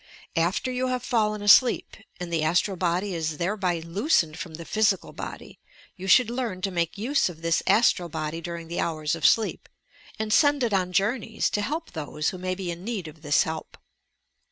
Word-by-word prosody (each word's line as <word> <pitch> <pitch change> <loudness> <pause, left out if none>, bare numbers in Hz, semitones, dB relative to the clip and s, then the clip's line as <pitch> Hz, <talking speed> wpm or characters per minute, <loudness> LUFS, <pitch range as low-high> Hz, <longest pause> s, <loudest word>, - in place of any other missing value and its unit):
After 175 +9 0
you 255 +1 -1
have 255 -1 -2
fallen 215 -4 0
alseep, 240 +4 +5
— - - -32
and 175 -1 -5
the 165 - +1
astral 175 +5 +1
body 180 +2 -1
is 160 -2 -2
thereby 180 -1 -1
loosened 170 - +1
from 165 -2 -6
the 170 +1 -9
physical 210 -1 +1
body, - - -8 0.4
you 190 0 -7
should 235 +4 +5
learn 240 -7 -3
to 195 - 0
make 170 +1 -1
use 245 +2 +1
of 165 -2 -11
this 165 0 +2
astral 195 -6 +3
body 155 +1 -4
during 170 -1 -6
the 170 - -4
hours 155 -2 -1
of 165 - +3
sleep, 225 -2 +1 0.5
and 215 -1 -1
send 290 -1 +4
it 230 -3 0
on 185 -2 +1
jonmeya, 220 +4 0
to 210 - 0
help 315 +9 -3
those 150 -2 -2
who 185 - -7
may 185 0 -2
be 185 -2 -4
in 170 +1 -8
need 205 -6 -4
of 155 0 -12
this 145 -2 +3
help. 160 0 -6
185 Hz, 200 wpm, -26 LUFS, 165-220 Hz, 0.5 s, alseep